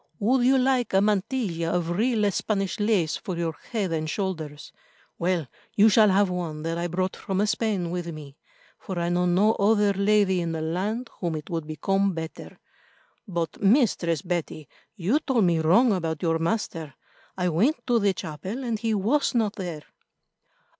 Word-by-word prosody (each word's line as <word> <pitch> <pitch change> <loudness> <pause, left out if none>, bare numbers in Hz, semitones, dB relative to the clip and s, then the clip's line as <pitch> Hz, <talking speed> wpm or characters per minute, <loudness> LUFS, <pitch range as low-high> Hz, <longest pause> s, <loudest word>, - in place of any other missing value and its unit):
"Would 245 +4 +2
you 265 +1 +5
like 255 -5 +1
a - - +6
mantilla 200 -4 0
of 175 -1 -1
real 215 +1 +1
Spanish 195 0 -2
lace 205 -7 +1
for 185 -5 -5
your 165 -2 -2 0.2
head 205 -7 -1
and 155 -1 -2
shoulders? 160 -6 -4 0.5
Well, 175 -2 0 0.3
you 210 +2 +6
shall 215 0 +5
have 200 +1 +4
one 165 -4 -4
that 165 +1 -2
I 175 - -1
brought 185 +2 -2
from 195 0 -1
Spain 210 -5 -1
with 175 -1 -3
me, 150 -4 -8 0.4
for 190 - -6
I 170 0 0
know 180 +1 +1
no 195 +5 +4
other 205 -1 +3
lady 200 -2 +2
in 165 -1 -2
the 160 - -3
land 200 +9 -2
whom 170 -3 -2
it 155 +1 -7
would 165 -2 -3
become 195 +5 0
better. 160 -1 -7 0.7
But, 170 -4 -3
Mistress 195 - +2
Betty, 170 -4 -3 0.3
you 210 - +1
told 260 -7 +1
me 170 -3 +3
wrong 205 +9 +4
about 165 -4 -3
your 165 -1 +1
master. 165 -5 -2 0.4
I 180 -1 +1
went 220 - +1
to 240 -2 +3
the 200 -2 +2
chapel 185 - -6
and 230 -3 -2
he 225 -1 0
was 245 +8 +1
not 220 -3 +1
there." 175 -7 -5
190 Hz, 175 wpm, -25 LUFS, 165-215 Hz, 0.7 s, a